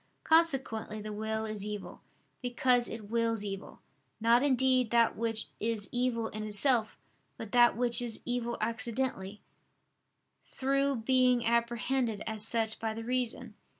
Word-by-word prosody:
Consequently 270 Hz, -10 st, +1 dB
the 210 Hz, 0 st, -6 dB
will 220 Hz, +1 st, -3 dB
is 215 Hz, -2 st, -5 dB
evil, 210 Hz, -1 st, -6 dB, 0.4 s
because 245 Hz, 0 st, +2 dB
it 215 Hz, -2 st, -8 dB
wills 230 Hz, -2 st, 0 dB
evil, 195 Hz, -1 st, -7 dB, 0.4 s
not 230 Hz, +2 st, +4 dB
indeed 260 Hz, -3 st, +3 dB
that 235 Hz, 0 st, +3 dB
which 225 Hz, -1 st, -2 dB
is 220 Hz, -2 st, -1 dB
evil 245 Hz, -2 st, -1 dB
in 215 Hz, 0 st, -5 dB
itself, 215 Hz, +2 st, +2 dB, 0.4 s
but 220 Hz, -2 st, -8 dB
that 240 Hz, -1 st, +5 dB
which 240 Hz, 0 st, +3 dB
is 235 Hz, -2 st, -4 dB
evil 240 Hz, -1 st, -2 dB
accidentally, 230 Hz, -4 st, -3 dB, 1.1 s
through 275 Hz, +1 st, +1 dB
being 250 Hz, 0 st, +2 dB
apprehended 235 Hz, -1 st, 0 dB
as 220 Hz, -1 st, -3 dB
such 225 Hz, -1 st, 0 dB
by 220 Hz, -1 st, -3 dB
the 225 Hz, -, -6 dB
reason. 250 Hz, 0 st, -2 dB
230 Hz, 135 wpm, -31 LUFS, 220-250 Hz, 1.1 s, that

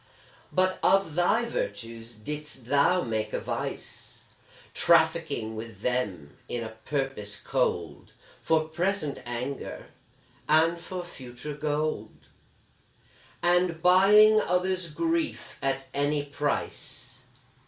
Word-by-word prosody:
But 185 Hz, 0 st, +2 dB
of 195 Hz, -5 st, +3 dB
thy 175 Hz, +8 st, +3 dB
virtues 115 Hz, -, -4 dB
didst 145 Hz, +2 st, -6 dB
thou 145 Hz, +7 st, +3 dB
make 110 Hz, -2 st, -2 dB
a -, -, 0 dB
vice, -, -, -5 dB, 0.5 s
Trafficking 110 Hz, -1 st, +3 dB
with 110 Hz, -2 st, -8 dB
them 105 Hz, -, -2 dB
in 120 Hz, -1 st, -2 dB
a 110 Hz, -, -5 dB
purpose 110 Hz, -2 st, -3 dB
cold, 85 Hz, -, -1 dB, 0.3 s
For 160 Hz, -1 st, +2 dB
present 170 Hz, -2 st, -1 dB
anger, 125 Hz, +3 st, -5 dB, 0.6 s
and 165 Hz, +2 st, +4 dB
for 180 Hz, +1 st, -5 dB
future 130 Hz, -2 st, -8 dB
gold 150 Hz, -6 st, -3 dB, 1.1 s
And 175 Hz, -1 st, +3 dB
buying 210 Hz, +4 st, +7 dB
others' 180 Hz, -1 st, 0 dB
grief 330 Hz, -, -2 dB
at 135 Hz, 0 st, -1 dB
any 145 Hz, +1 st, +1 dB
price. 145 Hz, 0 st, -3 dB
145 Hz, 100 wpm, -28 LUFS, 120-180 Hz, 1.1 s, buying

